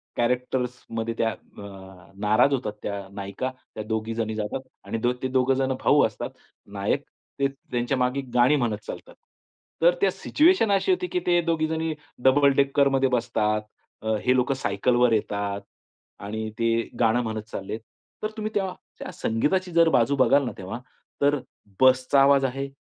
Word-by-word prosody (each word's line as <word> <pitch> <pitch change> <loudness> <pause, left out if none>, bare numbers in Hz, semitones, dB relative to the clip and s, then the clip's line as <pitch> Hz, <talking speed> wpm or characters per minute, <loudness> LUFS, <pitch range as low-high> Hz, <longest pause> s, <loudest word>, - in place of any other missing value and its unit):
कॅरेक्टर्समध्ये 125 -2 -2
त्या 115 - +2
अ, 95 -3 -12
नाराज 110 +7 +3
होतात 120 -6 -2
त्या 100 -1 -4
नायिका, 100 +6 -4 0.2
त्या 110 - -4
दोघीजणी 110 0 -2
जातात 110 +5 -4 0.2
आणि - - -3
द 120 - +3
ते 130 - +1
दोघेजण 130 +1 +1
भाऊ - - +5
असतात - - -4 0.5
नायक, - - 0 0.4
ते 140 - +3
त्यांच्या 130 -2 -3
मागे 125 +2 0
गाणी 125 +4 +5
म्हणत 120 -7 0
चालतात. - - -8 0.7
तर 175 +1 +5
त्या 195 - +4
सिच्युएशन 300 - +3
अशी 195 - +2
होती, 365 0 0
की 360 - -1
ते 175 0 +4
दोघीजणी 160 -1 0 0.3
डबल 140 +2 +5
डेकरमध्ये 140 -1 +3
बसतात. 110 -3 0 0.6
हे 125 0 +3
लोकं 125 +1 +2
सायकलवर 125 -2 +2
येतात 100 -2 -1 0.6
आणि 110 +2 -4
ते 115 - +2 0.3
गाणं 120 +1 +3
म्हणत 110 -1 -3
चाललेत. 100 +3 -5 0.4
तर 215 - 0
तुम्ही 215 0 -3
तेव्हा 190 -3 0 0.3
त्या - - -6
संगीताची 180 +11 0 0.2
बाजू 125 +2 +3
बघाल 140 +1 +4
ना 120 - -3
तेव्हा, 95 +5 -6 0.4
तर 145 0 +3 0.4
बसचा 130 +1 +5
आवाज 140 -1 +5
आहे. 135 +2 -2
125 Hz, 145 wpm, -25 LUFS, 110-140 Hz, 0.7 s, भाऊ